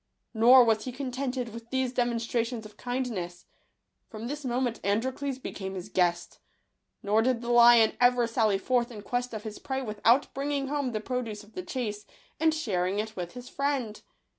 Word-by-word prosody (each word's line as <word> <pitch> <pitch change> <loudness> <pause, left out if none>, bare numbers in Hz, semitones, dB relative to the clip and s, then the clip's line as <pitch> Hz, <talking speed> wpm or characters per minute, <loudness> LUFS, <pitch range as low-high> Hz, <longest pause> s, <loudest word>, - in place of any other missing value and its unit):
Nor 245 +3 +8
was 220 -1 +1
he 255 - -3
contented 255 -1 -3
with 230 +1 -10
these 260 -1 -1
demonstrations 235 -1 -1
of 210 - -12
kindness. 225 -9 -4 0.6
From 220 +1 -7
this 290 +4 -5
moment 245 -2 -1
Androcles 255 +7 -1
became 195 -6 -6
his 185 +2 -7
guest; 175 -2 0 0.6
nor 210 +2 +3
did 245 0 +1
the 240 0 -3
lion 235 -2 +7
ever 245 -1 +5
sally 225 -3 +2
forth 240 +4 0
in 215 -4 -9
quest 245 +3 -2
of 215 -2 -6
his 215 -1 -7
prey 265 -1 -3
without 225 +3 +2
bringing 275 0 -2
home 285 -4 -1
the 215 - -2
produce 225 -3 -4
of 210 - -19
the 365 - -4
chase, 210 - -4 0.3
and 320 0 +4
sharing 195 - -1
it 220 +1 -3
with 175 -2 -5
his 245 0 -9
friend. 275 -6 -2
235 Hz, 175 wpm, -28 LUFS, 215-255 Hz, 0.6 s, Nor